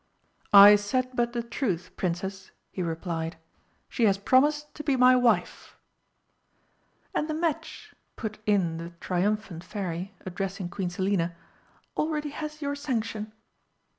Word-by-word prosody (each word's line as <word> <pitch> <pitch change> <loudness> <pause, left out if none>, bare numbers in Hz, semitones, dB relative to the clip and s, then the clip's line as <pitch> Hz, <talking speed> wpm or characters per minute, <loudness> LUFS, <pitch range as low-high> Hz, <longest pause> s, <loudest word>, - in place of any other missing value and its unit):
"I 205 +1 +11
said 255 +5 -1
but 240 -1 0
the 240 -1 -2
truth, 200 - -2
Princess," 190 +2 -3 0.2
he 185 - -4
replied. 165 -1 -3 0.5
"She 235 - +1
has 200 -2 +4
promised 295 +7 +2
to 300 - -7
be 280 -3 +2
my 255 0 +6
wife." 245 -2 +1 1.4
"And 300 - 0
the 310 - -1
match," 320 -2 -3 0.2
put 215 -2 -5
in 185 -6 +2
the 170 +1 -6
triumphant 190 -1 -1
Fairy, 185 0 -5
addressing 190 0 -4
Queen 180 0 -3
Selina, 180 -2 -1 0.6
"already 300 -1 -1
has 305 +1 -6
your 285 0 -1
sanction!" 225 -6 -3
205 Hz, 130 wpm, -27 LUFS, 185-255 Hz, 1.4 s, I